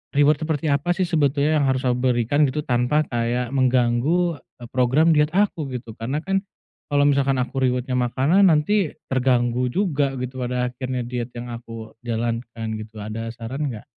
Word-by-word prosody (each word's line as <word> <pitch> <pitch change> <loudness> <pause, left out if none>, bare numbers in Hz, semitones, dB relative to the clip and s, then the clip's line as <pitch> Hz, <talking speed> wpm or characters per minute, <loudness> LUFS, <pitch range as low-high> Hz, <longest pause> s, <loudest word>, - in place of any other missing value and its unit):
reward 145 +1 +4
seperti 155 -1 -1
apa 145 +5 +1
sih 185 - +1
sebetulnya 150 -1 +2
yang - - +2
harus 130 -1 0
aku 125 - +2
berikan, 125 +5 +2
gitu, 150 +3 -3
tanpa 125 +4 +1
kayak 120 0 -1
mengganggu, 130 +6 +2
eee, 120 -2 -15
program 130 +6 +3
diet 150 +1 +2
aku, 195 -7 +1
gitu? 120 -2 -7
Karena 130 +6 -2
kan 195 +1 0 0.5
kalau 145 0 +3
misalkan 140 -1 +2
aku 130 +2 -3
reward-nya 125 0 0
makanan, 140 +10 +3
nanti 165 +4 +2 0.2
terganggu 125 -1 +1
juga 150 -6 +1
gitu 130 +1 -5
pada 125 0 -1
akhirnya 130 0 -3
diet 120 0 -4
yang 120 0 -6
aku 115 -1 -9
jalankan, 115 0 -3
gitu, 110 +1 -11
ada 110 +2 -5
saran 125 +6 -4
nggak? 110 -3 -9
130 Hz, 165 wpm, -22 LUFS, 120-150 Hz, 0.5 s, reward